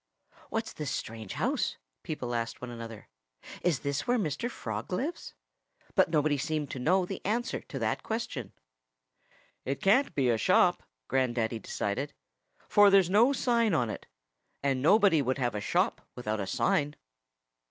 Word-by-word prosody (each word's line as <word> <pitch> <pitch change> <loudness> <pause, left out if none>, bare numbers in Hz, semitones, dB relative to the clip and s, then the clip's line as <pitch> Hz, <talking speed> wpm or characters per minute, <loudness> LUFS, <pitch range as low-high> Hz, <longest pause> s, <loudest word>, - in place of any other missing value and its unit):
"What's 225 0 -3
this 150 -3 -4
strange 110 -3 -5
house?" - - 0 0.2
people 125 -6 -4
asked 115 -1 -2
one 125 -1 -7
another. 115 -2 -8 0.5
"Is 170 -6 +1
this 140 -1 -2
where 245 +1 +3
Mr. 205 - -1
Frog 110 - -5
lives?" 280 - -3 0.6
But 190 -4 +4
nobody 150 -2 +2
seemed 150 0 -2
to 135 - -5
know 180 +8 +3
the 195 +1 -6
answer 235 +5 -1
to - - -8
that - - -1
question. 220 - -4 1.1
"It 135 +1 -2
can't 220 +3 +3
be 130 -4 +3
a 115 - +1
shop," - - +4 0.3
Grandaddy 120 -3 0
decided, 135 +8 -3 0.5
"for 205 -1 +6
there's 195 -2 +5
no 230 +7 +6
sign 235 -7 +2
on 120 -6 +1
it. - - -8 0.6
And 135 -2 +1
nobody 195 - +5
would 130 0 0
have 120 -4 0
a 105 - -3
shop - - +1
without 110 -3 -3
a 100 - -3
sign." 150 - +1
145 Hz, 155 wpm, -30 LUFS, 120-195 Hz, 1.1 s, for